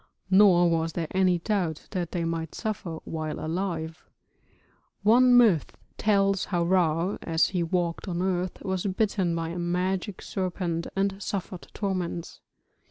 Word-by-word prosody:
Nor 185 Hz, -3 st, +6 dB
was 165 Hz, -1 st, 0 dB
there 170 Hz, -, -2 dB
any 185 Hz, -1 st, +3 dB
doubt 170 Hz, -4 st, -2 dB
that 180 Hz, -4 st, -3 dB
they 175 Hz, -, -2 dB
might 165 Hz, -1 st, -3 dB
suffer 195 Hz, -7 st, -4 dB
while 155 Hz, -1 st, -4 dB
alive; 165 Hz, -1 st, -3 dB, 1.0 s
one 245 Hz, +3 st, +6 dB
myth 215 Hz, -11 st, +3 dB, 0.2 s
tells 195 Hz, -2 st, +2 dB
how 175 Hz, -3 st, 0 dB
Ra, 170 Hz, 0 st, +1 dB
as 165 Hz, -1 st, +2 dB
he 180 Hz, -2 st, -1 dB
walked 170 Hz, +2 st, -1 dB
on 175 Hz, -2 st, -2 dB
earth, 185 Hz, -1 st, -2 dB
was 190 Hz, 0 st, -2 dB
bitten 190 Hz, -3 st, 0 dB
by 165 Hz, -1 st, -2 dB
a 175 Hz, +1 st, -5 dB
magic 180 Hz, +3 st, -2 dB
serpent 175 Hz, -3 st, -2 dB
and 195 Hz, 0 st, -1 dB
suffered 190 Hz, -3 st, -5 dB
torments. 185 Hz, -4 st, -3 dB
180 Hz, 140 wpm, -27 LUFS, 170-195 Hz, 1.0 s, Nor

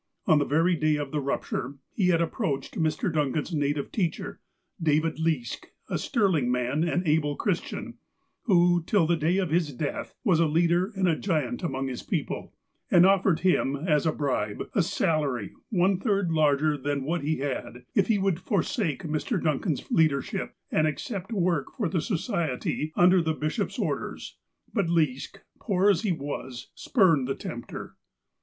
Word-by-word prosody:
On 155 Hz, -, +5 dB
the 145 Hz, -, +1 dB
very 165 Hz, +5 st, +2 dB
day 155 Hz, -1 st, +2 dB
of 145 Hz, -2 st, -4 dB
the 150 Hz, -, -1 dB
rupture, 140 Hz, 0 st, -3 dB, 0.2 s
he 190 Hz, -, +1 dB
had 170 Hz, -2 st, +3 dB
approached 145 Hz, -4 st, -2 dB
Mr. 160 Hz, +3 st, 0 dB
Duncan's 150 Hz, +2 st, -1 dB
native 145 Hz, -1 st, -1 dB
teacher, 180 Hz, -6 st, -2 dB, 0.4 s
David 155 Hz, 0 st, +1 dB
Leask, 160 Hz, -7 st, -1 dB, 0.3 s
a -, -, 0 dB
sterling 185 Hz, -, +1 dB
man 125 Hz, +5 st, 0 dB
and 175 Hz, +1 st, 0 dB
able 150 Hz, -1 st, +2 dB
Christian 185 Hz, +1 st, -3 dB, 0.5 s
(who, 175 Hz, -5 st, +4 dB
till 185 Hz, 0 st, +2 dB
the 170 Hz, +2 st, +2 dB
day 165 Hz, +3 st, +1 dB
of 185 Hz, -5 st, 0 dB
his 165 Hz, -3 st, +1 dB
death, 140 Hz, +3 st, -4 dB
was 185 Hz, -9 st, +3 dB
a 165 Hz, -, +4 dB
leader 170 Hz, +5 st, +2 dB
and 190 Hz, -1 st, +1 dB
a 165 Hz, -, +3 dB
giant 185 Hz, -, -1 dB
among 135 Hz, -6 st, -2 dB
this 130 Hz, -2 st, -4 dB
people), -, -, -3 dB, 0.4 s
and 175 Hz, 0 st, +6 dB
offered 190 Hz, -3 st, +3 dB
him, 175 Hz, -7 st, +2 dB
as 150 Hz, 0 st, +1 dB
a -, -, +3 dB
bribe, 130 Hz, -9 st, -2 dB
a -, -, +3 dB
salary 140 Hz, -9 st, 0 dB, 0.2 s
one 190 Hz, -2 st, +2 dB
third 200 Hz, -5 st, +1 dB
larger 150 Hz, -1 st, +2 dB
than 140 Hz, 0 st, -2 dB
what 165 Hz, +5 st, -1 dB
he 155 Hz, +2 st, 0 dB
had, 130 Hz, -3 st, -4 dB
if 195 Hz, -, +3 dB
he 220 Hz, -, +3 dB
would 195 Hz, -4 st, 0 dB
forsake 200 Hz, -, -1 dB
Mr. 160 Hz, -, -1 dB
Duncan's 155 Hz, -1 st, -1 dB
leadership, 150 Hz, -4 st, +1 dB, 0.2 s
and 155 Hz, 0 st, +3 dB
accept 190 Hz, +6 st, -4 dB
work 175 Hz, -8 st, +1 dB
for 210 Hz, -, 0 dB
the 170 Hz, -1 st, 0 dB
Society 160 Hz, -, -2 dB
under 180 Hz, +1 st, +5 dB
the 160 Hz, -1 st, -1 dB
bishop's 155 Hz, 0 st, -2 dB
orders. -, -, -4 dB, 0.3 s
But 200 Hz, -7 st, +1 dB
Leask, 160 Hz, +3 st, 0 dB, 0.2 s
poor 200 Hz, -1 st, +3 dB
as 190 Hz, -, 0 dB
he 215 Hz, -4 st, 0 dB
was, 140 Hz, -5 st, -5 dB
spurned 165 Hz, -, +3 dB
the 135 Hz, -, -1 dB
tempter. 120 Hz, 0 st, -7 dB
160 Hz, 165 wpm, -27 LUFS, 145-180 Hz, 0.5 s, and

